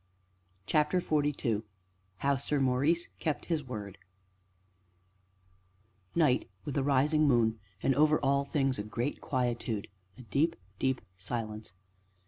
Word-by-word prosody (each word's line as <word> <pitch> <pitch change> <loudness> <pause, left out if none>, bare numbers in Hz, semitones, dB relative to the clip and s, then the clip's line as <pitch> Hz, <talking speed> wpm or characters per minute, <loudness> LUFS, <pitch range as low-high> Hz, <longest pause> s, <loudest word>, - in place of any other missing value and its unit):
CHAPTER 155 +4 +2
XLII 145 -9 0 0.6
HOW 140 +6 +2
SIR 145 +2 -1
MAURICE 140 +6 +2
KEPT 155 -2 -1
HIS 160 -4 -1
WORD 105 -7 -7 2.2
Night, 150 - +3 0.2
with 145 - -4
a 140 - +2
rising 145 +3 +3
moon, 115 -4 +3 0.2
and 135 - +4
over 150 +3 +4
all 140 0 +3
things 135 -3 0
a - - -1
great 120 +6 -3
quietude, 120 -5 -1 0.3
a 125 - -10
deep, 145 +8 +1 0.2
deep 130 -1 +1 0.2
silence. 110 -2 -5
135 Hz, 115 wpm, -31 LUFS, 120-150 Hz, 2.2 s, and